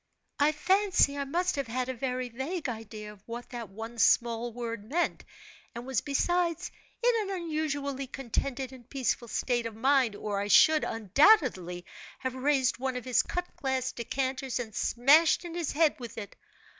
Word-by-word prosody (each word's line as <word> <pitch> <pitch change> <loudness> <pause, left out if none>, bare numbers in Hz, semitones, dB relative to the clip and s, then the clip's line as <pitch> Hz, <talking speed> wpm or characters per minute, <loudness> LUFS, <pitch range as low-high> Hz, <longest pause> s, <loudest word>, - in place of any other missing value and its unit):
"I 290 +1 +5
fancy 370 -1 +2
I 280 0 -2
must 355 +6 0
have 275 -3 -2
had 250 +2 -2
a 260 - -2
very 255 0 -3
vague 275 +8 -4
idea 220 -3 -7
of 200 - -20
what 240 +2 -7
that 235 -4 -6
one 225 +4 -8
small 235 +1 +3
word 230 -2 -5
meant, 310 +11 -1 0.5
and 235 +1 -6
was 265 -3 0
besides 340 +3 0 0.3
in 460 -4 +2
an 390 - -2
unusually 290 -4 -2
contented 265 0 -3
and 245 -3 -14
peaceful 255 -3 -1
state 240 0 -1
of 225 - -9
mind, 255 -2 +3
or 205 -1 -3
I 200 - -2
should, 310 +8 +6
undoubtedly, 220 - +3 0.3
have 260 -1 -3
raised 260 -1 +1
one 260 -1 -2
of 250 - -7
his 255 -2 +3
cut 355 0 -5
glass 260 -1 -1
decanters 260 +2 -2
and 225 -3 -5
smashed 300 - +4
in 340 - -6
his 340 -3 -2
head 310 -2 +3
with 240 -2 -8
it. 205 -3 -7
260 Hz, 170 wpm, -29 LUFS, 235-295 Hz, 0.5 s, should